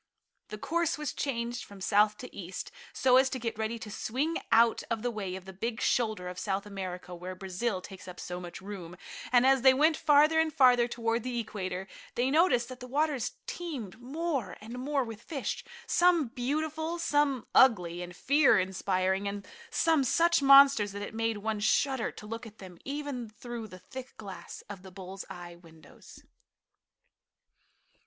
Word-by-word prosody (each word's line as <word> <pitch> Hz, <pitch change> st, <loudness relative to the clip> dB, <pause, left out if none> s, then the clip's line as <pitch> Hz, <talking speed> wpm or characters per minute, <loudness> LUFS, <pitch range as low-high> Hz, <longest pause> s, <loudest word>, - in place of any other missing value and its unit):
The 215 Hz, -, -7 dB
course 335 Hz, +7 st, 0 dB
was 300 Hz, -4 st, -3 dB
changed 240 Hz, -3 st, -2 dB
from 200 Hz, -1 st, -12 dB
south 210 Hz, +2 st, +3 dB
to 250 Hz, -, -10 dB
east, 185 Hz, -1 st, -6 dB, 0.2 s
so 255 Hz, -1 st, +4 dB
as 260 Hz, 0 st, +5 dB
to 260 Hz, -, -3 dB
get 225 Hz, -2 st, -4 dB
ready 220 Hz, +1 st, -1 dB
to 220 Hz, -2 st, -8 dB
swing 280 Hz, +10 st, -1 dB
out 230 Hz, 0 st, +5 dB
of 230 Hz, -1 st, -2 dB
the 245 Hz, -, 0 dB
way 195 Hz, -5 st, -4 dB
of 190 Hz, -1 st, -9 dB
the 190 Hz, -, -9 dB
big 230 Hz, +5 st, -3 dB
shoulder 215 Hz, -7 st, 0 dB
of 180 Hz, 0 st, -6 dB
South 195 Hz, 0 st, -2 dB
America 185 Hz, -3 st, -6 dB
where 180 Hz, +1 st, -7 dB
Brazil 190 Hz, +2 st, -2 dB
takes 190 Hz, 0 st, -11 dB
up 180 Hz, -1 st, -9 dB
so 180 Hz, 0 st, -5 dB
much 175 Hz, +1 st, -8 dB
room, 185 Hz, -3 st, -8 dB, 0.3 s
and 250 Hz, 0 st, +5 dB
as 270 Hz, -1 st, +5 dB
they 260 Hz, 0 st, +7 dB
went 310 Hz, +4 st, +4 dB
farther 305 Hz, +1 st, +5 dB
and 320 Hz, -1 st, +2 dB
farther 245 Hz, -3 st, +6 dB
toward 230 Hz, -1 st, -1 dB
the 245 Hz, 0 st, -3 dB
equator, 190 Hz, -4 st, -4 dB, 0.3 s
they 250 Hz, +2 st, +1 dB
noticed 295 Hz, -7 st, +4 dB
that 255 Hz, -1 st, -8 dB
the 250 Hz, -, -8 dB
waters 285 Hz, -1 st, 0 dB
teemed 250 Hz, -, -6 dB
more 275 Hz, -, -3 dB
and 230 Hz, +4 st, -8 dB
more 275 Hz, +1 st, 0 dB
with 225 Hz, -2 st, -8 dB
fish, 280 Hz, -2 st, -4 dB, 0.2 s
some 345 Hz, -7 st, +3 dB
beautiful, 310 Hz, +7 st, -2 dB
some 290 Hz, -6 st, +1 dB
ugly 180 Hz, -9 st, +4 dB
and 175 Hz, 0 st, -7 dB
fear 275 Hz, 0 st, +4 dB
inspiring, 190 Hz, +1 st, 0 dB
and 200 Hz, 0 st, -5 dB, 0.2 s
some 320 Hz, -4 st, +3 dB
such 335 Hz, +5 st, +3 dB
monsters 275 Hz, -7 st, +7 dB
that 205 Hz, 0 st, -5 dB
it -, -, -7 dB
made 225 Hz, -1 st, -1 dB
one 215 Hz, +1 st, -2 dB
shudder 260 Hz, +4 st, +1 dB
to -, -, -11 dB
look 225 Hz, +2 st, -6 dB
at 215 Hz, 0 st, -15 dB
them, 185 Hz, -3 st, -12 dB
even 275 Hz, -4 st, -4 dB
through 230 Hz, +1 st, -7 dB
the 185 Hz, -, -11 dB
thick 255 Hz, +8 st, -10 dB
glass 200 Hz, -3 st, -9 dB
of 205 Hz, -3 st, -8 dB
the 190 Hz, -, -11 dB
bulls 190 Hz, +1 st, -8 dB
eye 175 Hz, -1 st, -9 dB
windows. 165 Hz, -2 st, -16 dB
230 Hz, 180 wpm, -30 LUFS, 195-270 Hz, 0.3 s, they